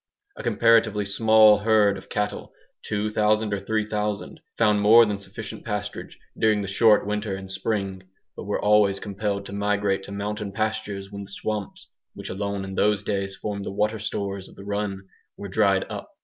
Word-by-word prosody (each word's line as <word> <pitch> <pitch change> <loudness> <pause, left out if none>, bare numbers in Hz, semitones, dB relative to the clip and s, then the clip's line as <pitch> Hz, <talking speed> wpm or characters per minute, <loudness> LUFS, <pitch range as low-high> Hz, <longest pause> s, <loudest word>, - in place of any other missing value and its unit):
A - - -7
comparatively 115 -3 +3
small 110 +1 +5
herd 105 -2 +3
of - - -11
cattle, 105 0 -3 0.4
2000 105 0 +1
or 100 - -1
3000, 105 -1 -2 0.2
found 105 -2 +3
more 115 +3 +8
than 105 -2 -2
sufficient 105 +2 -8
pasturage 105 -1 -5 0.2
during 110 -2 +2
the 100 - -4
short 105 +2 +4
winter 105 -1 -2
and 95 0 -8
spring, 95 -1 -2 0.3
but - - -8
were - - -1
always 105 -2 +3
compelled 100 0 -3
to 100 - -8
migrate 100 -1 0
to - - -10
mountain 105 0 -4
pastures 105 -2 -3
when 100 0 -7
the 100 - -9
swamps, 105 0 -5 0.2
which - - -7
alone 100 0 -3
in 95 - -7
those 105 +1 +2
days 95 -1 -2
formed 100 +1 -4
the - - -5
water 105 +2 0
stores 100 -2 -4
of - - -17
the 100 - -11
run, 100 -1 -3 0.3
were 100 - -6
dried 100 -1 +2
up. - - -7
105 Hz, 175 wpm, -24 LUFS, 100-105 Hz, 0.4 s, more